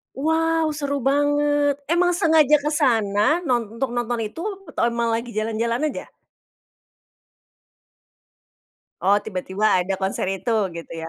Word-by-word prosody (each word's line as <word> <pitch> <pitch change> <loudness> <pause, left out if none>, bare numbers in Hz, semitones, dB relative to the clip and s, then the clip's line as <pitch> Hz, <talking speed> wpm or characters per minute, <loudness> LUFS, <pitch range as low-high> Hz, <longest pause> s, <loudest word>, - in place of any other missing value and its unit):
Wow 320 +1 +1
seru 285 -1 -2
banget! 290 +1 +1
Emang 350 +3 +2
sengaja 315 -4 +4
ke 290 - -8
sana 225 +4 +2
non 230 -3 -1
untuk 255 -2 -2
nonton 240 0 -1
itu, 325 +11 -8 0.2
atau 300 - -4
emang 235 -1 0
lagi 235 +1 -3
jalan-jalan 225 +2 -1
aja? 300 - -6 2.9
Oh 200 +2 +4
tiba-tiba 190 0 -4 0.2
ada 190 +2 -2
konser 190 0 -2
itu, 195 +4 -2 0.2
gitu 170 - -9
ya. 165 0 -6
245 Hz, 125 wpm, -22 LUFS, 215-295 Hz, 2.9 s, sengaja